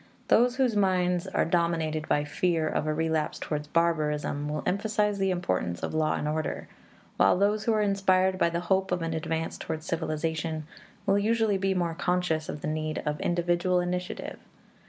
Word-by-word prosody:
Those 245 +2 +4
whose 255 -4 +2
minds 180 -3 +2
are - - +1
dominated 165 -2 0
by 145 - +2
fear 160 +2 0
of 155 - -1
a - - +2
relapse 160 0 0
towards 150 -1 -4
barbarism 150 -3 0
will 150 0 -3
emphasize 210 +1 0
the 195 0 +2
importance 95 - -1
of - - -2
law 155 -1 +1
and 150 - -2
order, 155 0 -2 0.5
while 95 - +5
those 205 +2 +1
who 230 - +3
are 215 -1 +2
inspired 190 -2 +2
by 170 - +4
the 170 +1 -2
hope 190 +1 +1
of 180 -2 0
an 165 0 -2
advance 160 0 -3
towards 160 0 -5
civilization 160 -1 -2 0.4
will 200 0 +3
usually 220 -1 +2
be 195 0 +1
more 170 -2 0
conscious 180 -2 0
of 150 - -5
the - - -3
need 155 0 -2
of 150 0 -2
individual 175 +1 +1
initiative. 180 +1 -3
170 Hz, 175 wpm, -28 LUFS, 155-190 Hz, 0.5 s, while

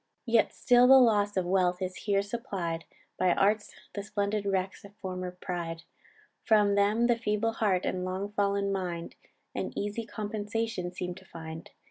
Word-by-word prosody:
"Yet 230 -2 +3
still 245 0 +5
the 265 +1 +9
loss 205 -5 +4
of 185 - +1
wealth 180 -1 +2
is 185 -1 -3
here 200 -1 0
supplied 195 -7 -4 0.3
By 180 -1 +4
arts, 205 +2 +2 0.2
the 200 - -3
splendid 205 0 -1
wrecks 190 -1 -1
of 200 0 -13
former 185 -2 -4
pride; 175 -2 -5 0.6
From 210 -2 +4
them 205 +4 +3
the 240 -1 +4
feeble 225 0 0
heart 205 -5 +1
and 180 -1 -1
long 190 +2 -3
fall'n 200 -1 +1
mind 175 -3 -3 0.4
An - - -4
easy 210 +2 -3
compensation 210 -3 -3
seem 180 0 -4
to 190 +1 -14
find. 160 -2 -8
200 Hz, 160 wpm, -29 LUFS, 185-215 Hz, 0.6 s, the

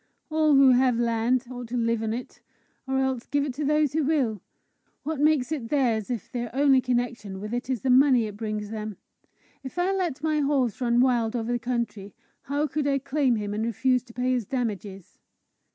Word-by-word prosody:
"All 310 -2 +3
who 270 -1 +7
have 250 -1 +3
land, 235 +2 +1
ought 245 -1 -7
to 245 +2 -3
live 230 -1 0
on 220 -1 -2
it, 240 +2 -6 0.5
or 265 0 0
else 265 -2 -1
give 285 +2 0
it 275 - -4
to 295 +4 -4
those 300 -1 +2
who 315 - +1
will. 265 - 0 0.6
What 305 0 -3
makes 295 -2 +2
it 260 -8 -3
theirs, 240 -7 +1
if 240 -4 -4
their 240 -1 -3
only 275 -1 +4
connection 240 -6 -2
with 210 +3 -6
it 245 +1 -3
is 255 -4 -1
the 260 - +1
money 255 -2 +5
it 210 -1 -6
brings 210 -1 -4
them? 215 -3 -5 0.7
If 265 +5 -8
I 355 +2 +1
let 350 -8 -2
my 310 -1 +1
horse 275 -6 0
run 240 0 +3
wild 240 -3 +2
over 235 0 -2
the 240 - 0
country, 235 -5 -4 0.3
how 285 +2 0
could 300 -1 -2
I 275 -1 +2
claim 275 -2 +1
him, 205 -1 -3
and 215 +1 -2
refuse 250 +3 +1
to 235 - -15
pay 250 +1 0
his 245 -5 -1
damages?" 205 -7 -4
250 Hz, 205 wpm, -26 LUFS, 230-275 Hz, 0.7 s, who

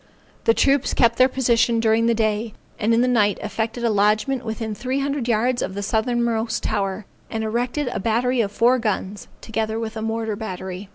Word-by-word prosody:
The 230 - +4
troops 275 -1 +2
kept 235 -1 +3
their 255 +1 +6
position 235 -3 +2
during 225 0 +2
the 235 - +3
day, 215 0 -1 0.2
and 220 0 +1
in 230 +1 +4
the 250 - +2
night 210 -5 +2
effected 225 +2 -3
a 230 - +2
lodgment 215 +6 +1
within 220 -1 -4
three 255 +5 -2
hundred 275 -3 -2
yards 240 +2 +1
of 190 - -3
the 200 - -3
southernmost 230 +1 0
tower, 200 -1 -2 0.2
and 220 -1 -3
erected 245 +6 -1
a - - -3
battery 235 +4 +1
of 200 -3 -2
four 245 +4 +3
guns, 205 -2 -3
together 220 0 -2
with 225 -1 -5
a 220 - -4
mortar 225 -1 -2
battery. 190 -2 -6
225 Hz, 190 wpm, -22 LUFS, 215-240 Hz, 0.2 s, their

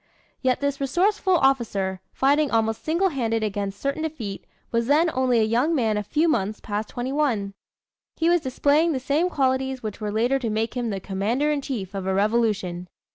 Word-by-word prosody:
Yet 255 0 +1
this 280 0 -1
resourceful 370 +7 +2
officer, 215 - +1
fighting 285 +2 +2
almost 225 -1 0
single 340 +5 +1
handed 230 -7 -1
against 200 -1 -3
certain 275 +2 -2
defeat, 270 -11 -5 0.2
was 230 0 0
then 315 +4 +4
only 255 -2 +2
a - - +4
young 245 +9 +2
man 225 -6 +1
a 210 - 0
few 305 - +1
months 215 -8 0
past 210 0 -4
twenty 245 +2 -4
one. 230 -10 0 0.6
He 325 - +1
was 345 0 +4
displaying 290 +5 +2
the 265 - -1
same 290 +7 +1
qualities 265 -3 0
which 215 0 -5
were 210 -1 -2
later 240 +6 +1
to 235 -4 -2
make 220 +1 -1
him 240 -2 -1
the 195 -2 -3
commander 215 +10 -1
in 290 -1 0
chief 215 -9 -5
of 195 -1 -4
a 190 - +1
Revolution. 200 -4 0
245 Hz, 190 wpm, -24 LUFS, 215-285 Hz, 0.6 s, then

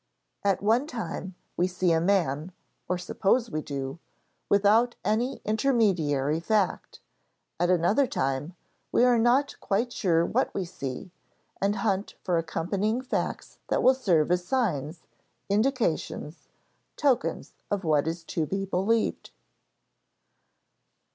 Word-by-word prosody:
At 200 -1 +1
one 235 +7 +3
time, 210 - -5 0.2
we 180 - +2
see 180 -1 0
a 165 0 +3
man 170 -3 +1 0.4
(or 180 - +1
suppose 210 +6 0
we 155 - -2
do) 140 +1 -5 0.5
without 215 +4 +4
any 240 +5 0
intermediary 185 - +1
fact; 200 +1 -1 0.6
at 175 +1 +2
another 185 +10 +3
time, 135 - -2 0.4
we - - +4
are 245 -2 +5
not 250 +5 +2
quite 230 +5 -1
sure 170 -6 +2
what 260 +8 0
we 195 - -1
see, 170 -1 -6 0.5
and 200 +1 +2
hunt 200 -1 -1
for 175 -2 +1
accompanying 195 +8 -1
facts 260 - -3
that - - 0
will 260 - +7
serve 175 - +2
as 180 0 +2
signs, 175 - -1 0.5
indications, 210 - -1 0.5
tokens 275 -4 0 0.2
of 200 -1 -1
what 155 -2 +2
is 165 +1 -3
to 160 -1 -2
be 195 +3 -2
believed. 195 +4 0
190 Hz, 125 wpm, -27 LUFS, 165-225 Hz, 0.6 s, will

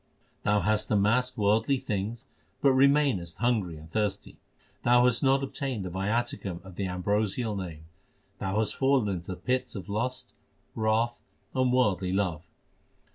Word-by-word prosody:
Thou 105 0 +2
hast 105 0 +1
amassed 115 +5 +2
worldly 110 +6 +2
things 110 -3 -3 0.3
but 140 - +4
remainest 130 - +3
hungry 105 -9 0
and 80 +1 -12
thirsty. 100 +2 -3 0.4
Thou 120 0 +5
hast 125 -2 +3
not 135 0 +3
obtained 135 -6 -3
the 90 - -5
viaticum 100 -1 -2
of 95 -2 -11
the 100 0 -2
ambrosial 105 +4 -1
Name. 85 -5 -6 0.5
Thou 95 +1 -2
hast 110 -1 +1
fallen 135 -5 +2
into 90 -3 -4
the - - -7
pits 125 -1 -1
of 100 0 -7
lust, 120 +5 -3 0.4
wrath, 110 +2 +1 0.3
and 130 -1 +2
worldly 100 -8 +2
love. 90 -6 -1
105 Hz, 145 wpm, -28 LUFS, 95-125 Hz, 0.5 s, Thou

